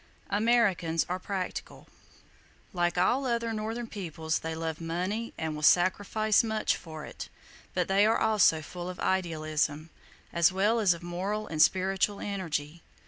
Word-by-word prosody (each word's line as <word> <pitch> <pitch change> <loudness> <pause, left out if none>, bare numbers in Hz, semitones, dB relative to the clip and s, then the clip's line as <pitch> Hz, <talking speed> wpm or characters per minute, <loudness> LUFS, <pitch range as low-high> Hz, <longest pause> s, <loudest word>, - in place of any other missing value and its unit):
Americans 200 -7 +2
are 180 +1 -2
practical. 185 -1 -5 0.9
Like 175 -1 0
all 255 +9 +2
other 235 -1 -1
northern 225 +2 -3
peoples, 165 -7 -3
they 160 0 -4
love 160 0 -4
money 185 +8 -2
and 160 -1 -3
will 150 - -6
sacrifice 205 +7 +3
much 220 -1 0
for 155 -2 -9
it, - - -8 0.5
but 180 -2 +1
they 195 +1 +4
are 225 - +3
also 200 -8 +3
full 175 +3 -7
of 180 - -8
idealism, 155 -3 -1 0.4
as 170 +1 +4
well 205 +5 +2
as 190 -6 +4
of 170 - -12
moral 190 +5 -3
and 155 -5 -1
spiritual 190 +3 +2
energy. 165 -5 -4
185 Hz, 145 wpm, -29 LUFS, 165-210 Hz, 0.9 s, they